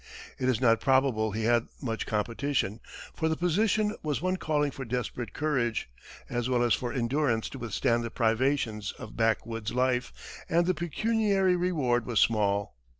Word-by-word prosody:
It 130 - +1
is 125 - +1
not 115 -3 +3
probable 130 -5 +2
he 110 +2 -3
had 115 +1 +2
much 115 -5 -3
competition, 115 +1 -1 0.3
for 160 -1 -1
the 160 - +1
position 210 +4 +1
was 150 -2 -1
one 185 +2 0
calling 150 -4 0
for 135 - -7
desperate 120 -2 -3
courage, 125 -7 -1 0.4
as 120 0 -2
well 125 -1 +2
as 120 -3 +3
for 120 -1 -1
endurance 125 -2 0
to 135 - -8
withstand 115 +1 0
the 115 - -3
privations 115 -2 0
of 110 - -10
back 110 -1 +1
woods 115 -2 -4
life, 125 0 -2
and 170 +1 +3
the 185 - +2
pecuniary 195 +2 +1
reward 145 -10 0
was 120 -3 +1
small. 100 - +2
125 Hz, 165 wpm, -28 LUFS, 115-155 Hz, 0.4 s, not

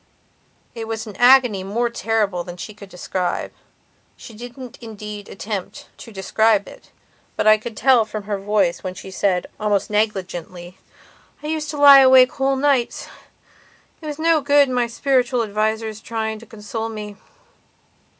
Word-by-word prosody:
It 225 -2 -6
was 220 0 -4
an 210 -3 -10
agony 245 -6 +5
more 225 +5 -1
terrible 215 -6 -1
than 175 0 -9
she 210 +5 -8
could 200 -1 -13
describe. 180 0 -3 0.7
She 230 - -12
didn't 245 +2 -10
indeed 210 -2 -8
attempt 195 -1 -6
to 230 - -12
describe 210 +1 +1
it, - - -14 0.5
but - - -1
I 215 0 +6
could 220 0 -8
tell 250 -2 +4
from 215 -1 -7
her 200 0 -3
voice 195 -3 0
when 185 -1 -5
she 190 +1 -10
said, 185 -2 0
almost 210 -1 0
negligently, 185 -4 -3 0.6
"I - - -5
used 310 -1 -3
to 300 - -5
lie 285 -1 +9
awake 260 -1 +7
whole 270 -1 0
nights. 270 -3 0 0.9
It 310 - -8
was 295 -1 -5
no 325 -1 +2
good 285 0 +4
my 245 -2 0
spiritual 250 0 +1
advisers 220 +1 -2
trying 220 -1 -4
to 230 - -15
console 225 0 -6
me." 210 -2 -7
220 Hz, 155 wpm, -21 LUFS, 205-250 Hz, 0.9 s, lie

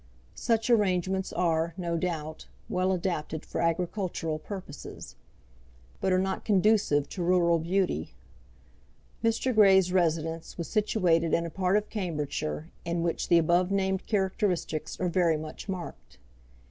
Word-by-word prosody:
Such 225 -1 0
arrangements 190 -3 +1
are, 165 -1 0
no 170 -2 -2
doubt, 160 -2 -3 0.2
well 185 +1 0
adapted 170 -4 -2
for - - -3
agricultural 170 -1 -1
purposes, 185 -4 -8 0.8
but 190 - 0
are 185 - +4
not 190 +1 -1
conducive 200 -8 +3
to 185 - -5
rural 170 -1 +3
beauty. 175 - -1 1.1
Mr. 230 +3 +1
Grey's 190 -4 +6
residence 165 -2 0
was 170 - -4
situated 180 -6 +2
in 170 - 0
a 165 - -5
part 185 +3 +2
of 210 - -3
Cambridgeshire 155 -4 -3
in 170 0 -1
which 170 -1 -1
the 170 - +5
above 175 +2 +3
named 190 -1 0
characteristics 190 -6 -1
are 185 - 0
very 170 -2 +2
much 155 +6 -8
marked. 170 - -7
180 Hz, 135 wpm, -28 LUFS, 165-190 Hz, 1.1 s, Grey's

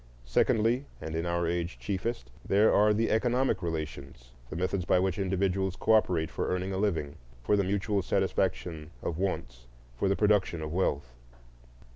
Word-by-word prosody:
Secondly, 115 - +2
and 80 0 -5
in 85 +1 -1
our 85 0 0
age 85 +1 -2
chiefest, 100 - -3
there 105 +3 +4
are 105 +1 +5
the 110 +2 +1
economic 120 -1 +1
relations,—the 70 -6 -6
methods 90 +2 -1
by 90 - +3
which 95 +1 0
individuals 95 0 0
cooperate 90 -8 +2
for - - -2
earning 90 +1 -1
a - - -2
living, 80 -9 -1 0.3
for 105 - +3
the 100 - +2
mutual 100 +1 0
satisfaction 90 -4 -1
of 85 -1 -3
wants, - - -3 0.3
for 95 - 0
the 100 - +2
production 100 -6 +2
of 75 +1 -5
wealth. 70 -8 -1
95 Hz, 155 wpm, -29 LUFS, 80-100 Hz, 0.3 s, are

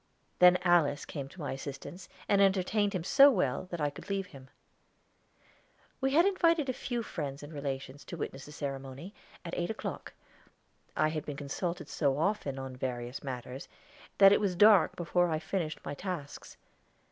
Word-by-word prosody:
Then 180 0 +8
Alice 165 -5 +3
came 140 -3 -6
to 185 - -15
my 145 - -3
assistance 140 +7 -7 0.2
and 200 -1 +4
entertained 200 +2 +2
him 180 -4 -2
so 275 +9 +7
well 180 - 0
that 175 - -5
I 145 -1 0
could 145 - -12
leave 195 -1 -1
him. 135 -6 -14 1.5
We 270 0 0
had 335 +4 +6
invited 335 -6 +2
a - - +1
few 240 -1 -3
friends 140 -7 -5
and 145 +2 -9
relations 140 -1 -5
to 170 - -7
witness 135 -3 -5
the - - -10
ceremony, 140 +4 -6 0.3
at 170 - -6
eight 175 - -2
o'clock. 220 - -5 0.8
I 155 - +3
had 155 -1 -3
been 145 -2 -6
consulted 170 +5 -4
so 140 -3 0
often 160 -5 -1
on 135 -1 -6
various 125 0 -4
matters 130 0 -6 0.5
that 195 -1 +8
it 205 - +4
was 195 -3 0
dark 205 -1 +6
before 175 +1 +1
I 160 - 0
finished 160 0 -3
my - - -4
tasks. 170 -3 -6
165 Hz, 170 wpm, -31 LUFS, 140-195 Hz, 1.5 s, Then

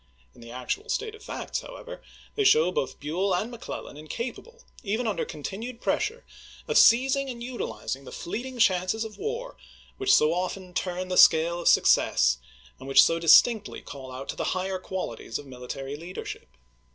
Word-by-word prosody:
In - - -17
the 115 - -11
actual 130 - -4
state 440 -1 -2
of 440 0 -13
facts, - - -4
however, - - -10 0.3
they 425 - 0
show 175 - +5
both 135 - -3
Buell 180 +6 0
and 215 +6 -2
Mc 235 -1 -10
Clellan 145 - -7
incapable, 240 - -7 0.2
even 220 +4 -2
under 205 -7 -1
continued 220 - -6
pressure, 465 - -1 0.4
of - - +4
seizing 265 +3 +5
and 235 -2 -6
utilizing 135 - -5
the 130 - -11
fleeting 250 +8 -5
chances 190 +1 +2
of 220 - -10
war 470 +4 -4 0.4
which 395 0 +1
so 155 +2 +5
often 180 +1 -4
turn 185 0 -3
the 180 - -1
scale 165 +1 +6
of - - -2
success, 65 0 +4 0.4
and 130 - -10
which 135 - +7
so 165 0 +2
distinctly 210 +6 +5
call 135 -2 -9
out 130 +2 -8
the - - -3
higher 185 0 -2
qualities 180 -12 -5
of 145 - -10
military 135 +2 -7
leadership. 170 +5 -8
185 Hz, 170 wpm, -27 LUFS, 150-245 Hz, 0.4 s, which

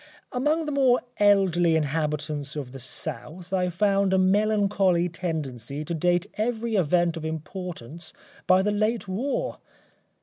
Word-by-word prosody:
Among 300 +6 +1
the 300 - -3
more 265 -3 +3 0.2
elderly 190 -5 +4
inhabitants 150 -1 -2
of 140 -4 -5
the 135 - -9
South 155 - -6
I 180 -1 +1
found 195 +1 +2
a - - +4
melancholy 195 -2 +3
tendency 150 -5 -4
to 170 - -3
date 175 +2 +1
every 230 +1 -1
event 175 -1 +2
of 160 - -6
importance 160 -1 -6 0.4
by 185 +1 +5
the 210 - +1
late 215 +1 0
war. 230 +10 -2
180 Hz, 135 wpm, -26 LUFS, 160-205 Hz, 0.4 s, by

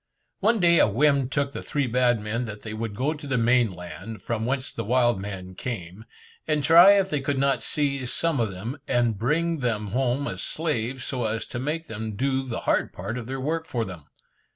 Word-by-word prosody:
One 220 +3 +3
day 170 -2 +5
a - - +6
whim 135 +4 +2
took 140 0 -1
the - - -5
three 145 -2 -1
bad 120 -1 +2
men 110 +4 -2
that 105 -2 -8
they 110 - -6
would 110 -1 -4
go 140 +8 0
to 150 -2 -9
the 135 -2 0
main 120 -1 +3
land, 90 +5 -9
from 115 -1 -2
whence 135 0 -2
the 115 - -4
wild 120 -2 +2
men 95 -2 -6
came, 95 -2 -6 0.4
and 150 -2 +1
try 170 +6 +9
if 190 -1 +1
they 145 - 0
could 140 0 -1
not 135 0 +2
seize 140 -4 -1
some 165 -5 0
of 115 -3 +1
them, 110 +10 -6
and 120 -2 +2
bring 160 +7 +1
them 110 -5 -1
home 130 +4 0
as - - -4
slaves, 130 -5 -2
so 125 -3 -2
as 110 +1 -2
to 120 - -6
make 155 +5 -2
them 110 -3 -5
do 135 +3 0
the 115 - -3
hard - - +1
part 100 +6 -5
of 120 -2 -5
their 135 +1 -4
work 160 +4 -2
for 115 -2 -1
them. 85 -7 -9
125 Hz, 220 wpm, -25 LUFS, 110-145 Hz, 0.4 s, try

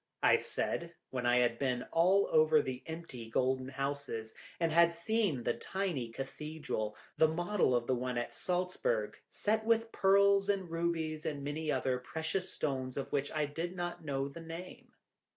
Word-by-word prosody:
I - - +7
said, 170 0 -2 0.2
when 125 -2 -1
I 120 0 +5
had 120 -1 +1
been 125 -3 0
all 185 +4 +4
over 155 0 +6
the 130 -2 -3
empty 160 -8 -7
golden 130 +2 +1
houses, 135 -5 -3 0.3
and 165 -1 +2
had 170 +1 +6
seen 170 - 0
the 120 - +1
tiny 180 -12 -2
cathedral, 135 -3 -4 0.2
the 160 - +6
model 175 -3 +1
of 120 -1 +1
the 130 - +1
one 125 0 -2
at 120 - -2
Saltzburg, 185 - -1
set 220 +1 0
with 225 0 +2
pearls 200 +1 +4
and 190 -4 0
rubies, 165 -2 -1
and 150 -4 -3
many 150 +2 -2
other 130 -2 0
precious 160 +8 -3
stones 130 -3 -2
of 140 - -4
which 140 0 0
I 155 -1 0
did 165 +5 -4
not 175 -1 -4
know 135 -2 -1
the 140 +4 -9
name. 180 +10 -9
155 Hz, 170 wpm, -33 LUFS, 130-175 Hz, 0.3 s, I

